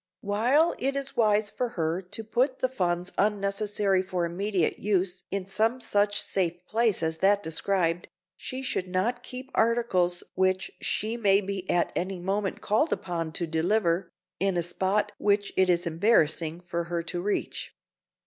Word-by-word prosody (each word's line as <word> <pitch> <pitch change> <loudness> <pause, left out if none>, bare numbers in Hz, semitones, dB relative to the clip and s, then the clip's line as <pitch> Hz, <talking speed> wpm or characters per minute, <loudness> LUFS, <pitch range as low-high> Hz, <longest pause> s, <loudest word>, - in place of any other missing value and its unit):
While 245 +11 +3
it 275 +1 0
is 275 -1 -3
wise 210 -2 +3
for 250 - -2
her 165 +2 0
to 205 +4 -6
put 250 +5 +1
the 255 - +1
funds 180 -6 -1
unnecessary 200 -1 +1
for 185 -2 -2
immediate 185 +1 -1
use 190 -2 0
in 195 -1 -2
some 220 +6 +1
such 205 -3 +1
safe 175 -2 -1
place 220 -4 +1
as 160 0 -1
that 200 +1 +3
described, 170 +1 0 0.3
she 260 +6 -5
should 185 -7 -1
not 205 +7 0
keep 255 +2 -7
articles 220 -7 +2
which 185 0 +1
she 220 +3 -1
may 200 -4 +4
be 195 -2 -5
at 175 - +2
any 185 +1 -2
moment 195 +2 -2
called 220 +10 +1
upon 165 -3 -2
to 170 - -2
deliver, 170 +2 +1 0.3
in 195 -1 +1
a 170 - +1
spot 190 +4 0
which 205 0 +1
it 190 -1 +3
is 175 0 +2
embarrassing 165 -2 +2
for 170 -1 -3
her 170 0 -2
to 175 +1 -3
reach. 205 +2 -3
195 Hz, 160 wpm, -27 LUFS, 175-215 Hz, 0.3 s, may